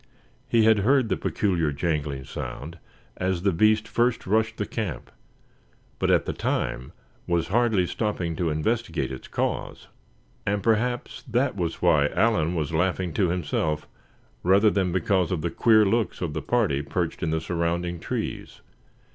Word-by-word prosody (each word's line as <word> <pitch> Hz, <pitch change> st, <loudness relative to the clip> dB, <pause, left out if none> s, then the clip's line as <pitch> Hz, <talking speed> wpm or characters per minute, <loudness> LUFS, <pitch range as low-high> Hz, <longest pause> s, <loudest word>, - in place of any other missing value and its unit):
He 115 Hz, -1 st, +4 dB
had 110 Hz, -1 st, +5 dB
heard 125 Hz, +3 st, +3 dB
the -, -, +2 dB
peculiar 85 Hz, -7 st, 0 dB
jangling 70 Hz, -2 st, -2 dB
sound 80 Hz, +5 st, -7 dB, 0.4 s
as 95 Hz, -1 st, -1 dB
the 100 Hz, -, +3 dB
beast 110 Hz, +5 st, +3 dB
first 120 Hz, 0 st, +1 dB
rushed 110 Hz, +3 st, +1 dB
the 105 Hz, -, -1 dB
camp; 105 Hz, -5 st, -5 dB, 0.9 s
but -, -, +1 dB
at -, -, +3 dB
the -, -, -2 dB
time 65 Hz, -, -2 dB, 0.4 s
was 85 Hz, -1 st, 0 dB
hardly 110 Hz, -3 st, +2 dB
stopping 90 Hz, -4 st, -2 dB
to 85 Hz, -2 st, 0 dB
investigate 80 Hz, -, -1 dB
its 65 Hz, -, -8 dB
cause. -, -, -3 dB, 0.5 s
And 100 Hz, -1 st, -1 dB
perhaps 120 Hz, +3 st, 0 dB
that 125 Hz, +2 st, +1 dB
was 85 Hz, -3 st, -3 dB
why 75 Hz, -5 st, +4 dB
Allan 90 Hz, -4 st, +1 dB
was 80 Hz, -1 st, -2 dB
laughing 90 Hz, +1 st, 0 dB
to 95 Hz, -5 st, +2 dB
himself, 80 Hz, -3 st, -1 dB, 0.5 s
rather 100 Hz, +4 st, +4 dB
than 95 Hz, -3 st, 0 dB
because 95 Hz, 0 st, +1 dB
of 90 Hz, -4 st, -1 dB
the 85 Hz, -, -1 dB
queer 110 Hz, -2 st, +5 dB
looks 115 Hz, +3 st, 0 dB
of 85 Hz, -4 st, -3 dB
the 80 Hz, -, -3 dB
party 105 Hz, -, +1 dB
perched 85 Hz, +3 st, -3 dB
in 85 Hz, -, 0 dB
the 80 Hz, 0 st, 0 dB
surrounding 85 Hz, +1 st, -2 dB
trees. -, -, -5 dB
90 Hz, 155 wpm, -25 LUFS, 80-110 Hz, 0.9 s, had